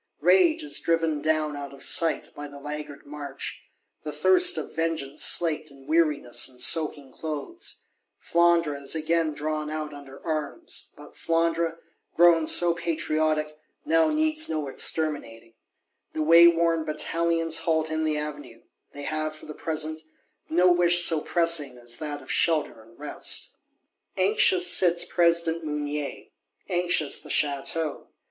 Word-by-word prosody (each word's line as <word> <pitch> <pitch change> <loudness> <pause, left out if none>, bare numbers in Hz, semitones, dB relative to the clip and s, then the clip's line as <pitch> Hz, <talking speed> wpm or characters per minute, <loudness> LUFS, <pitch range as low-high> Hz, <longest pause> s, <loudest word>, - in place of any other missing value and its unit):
Rage 335 -4 +4
is 305 - 0
driven 165 -3 0
down 155 -1 0
out 140 -1 -7
of - - -7
sight, 165 -2 +2
by 145 0 -7
the 145 0 -12
laggard 150 0 -7
march; 145 -1 -7 0.4
the - - -6
thirst 365 -1 +3
of - - -6
vengeance 160 -3 -1
slaked 155 -2 +2
in 135 -1 -16
weariness 155 -7 +1
and 125 -1 -15
soaking 145 -2 +1
clothes. 165 - -6 0.3
Flandre 170 -4 +2
is 140 +3 0
again 160 0 0
drawn 155 0 -3
out 155 -1 -5
under 140 -1 -12
arms: 160 - -4
but - - -14
Flandre, 165 0 0 0.4
grown 170 -2 +5
so 175 -1 +5
patriotic, 155 -2 -1 0.3
now 325 +1 +3
needs 310 0 0
no 155 -3 -2
"exterminating." 135 -6 -1 0.6
The 155 - -1
wayworn 165 0 +5
Batallions 165 +1 0
halt 160 -1 0
in 160 0 -1
the 155 -1 0
Avenue: 145 -6 -7 0.3
they 145 - -8
have, 155 +1 -3
for 155 - -14
the 150 - -8
present, 155 0 -4 0.5
no 180 +2 +4
wish 175 0 +3
so 160 -2 0
pressing 165 -7 0
as 120 -1 -1
that 150 -2 -5
of - - -7
shelter 155 -8 +1
and 115 +1 -20
rest. 150 0 -5 0.6
Anxious 375 -3 +3
sits 175 - +4
President 170 -1 +1
Mounier; 150 -1 -4 0.4
anxious 175 -4 +1
the - - -12
Château. 150 +2 -1
155 Hz, 140 wpm, -26 LUFS, 150-170 Hz, 0.6 s, grown